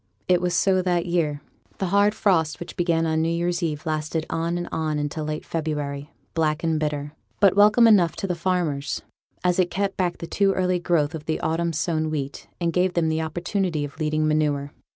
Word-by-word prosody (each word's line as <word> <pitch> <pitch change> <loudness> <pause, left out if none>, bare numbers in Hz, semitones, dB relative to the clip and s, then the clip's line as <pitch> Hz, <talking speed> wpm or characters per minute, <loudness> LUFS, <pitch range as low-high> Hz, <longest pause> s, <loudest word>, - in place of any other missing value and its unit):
It 180 -1 +3
was 180 -1 0
so 185 +1 +3
that 175 -2 0
year; 160 -5 0 0.4
the 190 - -2
hard 205 +2 +3
frost 165 -7 +1
which 175 - -8
began 170 -2 +1
on 160 0 +1
new 165 - +1
year's 175 +1 -1
eve 155 -2 -2
lasted 155 0 -2
on 165 +1 -1
and 175 - -4
on 155 -1 -1
into 145 +1 -3
late 155 0 -4
February, 150 -3 -3 0.2
black 155 -1 0
and 160 -2 +1
bitter, 150 -1 -2 0.3
but 195 -2 +5
welcome 210 +3 +6
enough 195 -7 +5
to - - -4
the 185 - -1
farmers, 170 -5 -1 0.4
as 180 0 +2
it 180 -1 +3
kept 195 0 -2
back 180 -2 0
the - - -6
too 195 +3 +2
early 185 -1 +1
growth 165 -3 +1
of 155 -2 -7 0.2
autumn 170 +1 0
sown 155 0 -1
wheat, 140 -3 -4
and 170 -1 0
gave 180 +1 +1
them 165 -2 +2
the 160 0 0
opportunity 175 0 -1
of 145 +3 -11
leading 155 0 +1
manure. 145 -2 0
165 Hz, 200 wpm, -24 LUFS, 155-180 Hz, 0.4 s, welcome